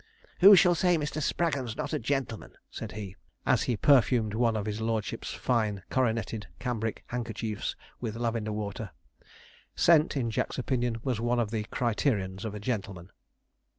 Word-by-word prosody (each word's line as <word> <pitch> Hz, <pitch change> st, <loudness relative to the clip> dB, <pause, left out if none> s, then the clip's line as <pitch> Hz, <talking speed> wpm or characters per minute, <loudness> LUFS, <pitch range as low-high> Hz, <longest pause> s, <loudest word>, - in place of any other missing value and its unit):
'Who 200 Hz, +2 st, +10 dB
shall 180 Hz, -1 st, +6 dB
say 175 Hz, +1 st, +3 dB
Mr. 150 Hz, 0 st, -3 dB
Spraggon's 140 Hz, -8 st, -1 dB
not -, -, -3 dB
a -, -, 0 dB
gentleman?' 130 Hz, -3 st, -3 dB
said -, -, -6 dB
he, 100 Hz, -3 st, -7 dB, 0.3 s
as -, -, +3 dB
he 120 Hz, -, +1 dB
perfumed 120 Hz, -4 st, +4 dB
one 115 Hz, 0 st, +2 dB
of 105 Hz, -, -3 dB
his 105 Hz, 0 st, -3 dB
lordship's 110 Hz, 0 st, -2 dB
fine 110 Hz, -6 st, 0 dB
coronetted 115 Hz, -5 st, 0 dB
cambric 115 Hz, -3 st, -3 dB
handkerchiefs 115 Hz, -3 st, -3 dB, 0.2 s
with 115 Hz, -3 st, -4 dB
lavender 115 Hz, -2 st, -1 dB
water. 105 Hz, -, -4 dB, 0.8 s
Scent, 155 Hz, -3 st, +4 dB
in 120 Hz, -4 st, 0 dB
Jack's -, -, -2 dB
opinion, 125 Hz, -2 st, -1 dB
was 125 Hz, -5 st, -1 dB
one 120 Hz, +1 st, +1 dB
of 110 Hz, -3 st, 0 dB
the 110 Hz, -2 st, -2 dB
criterions 105 Hz, -5 st, -1 dB
of 105 Hz, -1 st, -4 dB
a -, -, -5 dB
gentleman. 100 Hz, -5 st, -4 dB
115 Hz, 155 wpm, -29 LUFS, 105-125 Hz, 0.8 s, Who